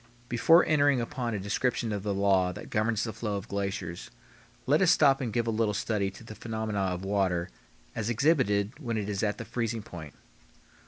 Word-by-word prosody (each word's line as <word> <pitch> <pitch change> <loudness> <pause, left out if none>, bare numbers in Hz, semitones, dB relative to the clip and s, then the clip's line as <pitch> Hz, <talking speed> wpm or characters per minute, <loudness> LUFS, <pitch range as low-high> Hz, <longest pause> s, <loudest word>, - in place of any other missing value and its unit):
Before 165 +9 +5
entering 145 -3 +3
upon 120 -1 -3
a - - -2
description 115 +3 -1
of 100 -1 -2
the 105 +1 -2
law 95 -2 +2
that - - -10
governs 110 0 +1
the 110 - -3
flow 105 -1 -3
of 100 +2 -7
glaciers, 100 -4 -4 0.6
let 150 +5 +3
us 185 - +5
stop 135 -4 +5
and 120 -4 -2
give 115 +1 0
a 115 - 0
little 110 -2 0
study 100 -2 0
to 95 - -13
the 110 - -9
phenomena 110 -2 -3
of 95 -1 -2
water 95 -5 0 0.4
as 110 +1 -2
exhibited 120 -4 +1
when 120 -7 -3
it 105 -2 -2
is 100 -2 -2
at 105 -1 0
the - - -6
freezing 115 -2 -3
point. 80 -7 -10
110 Hz, 200 wpm, -28 LUFS, 100-120 Hz, 0.6 s, Before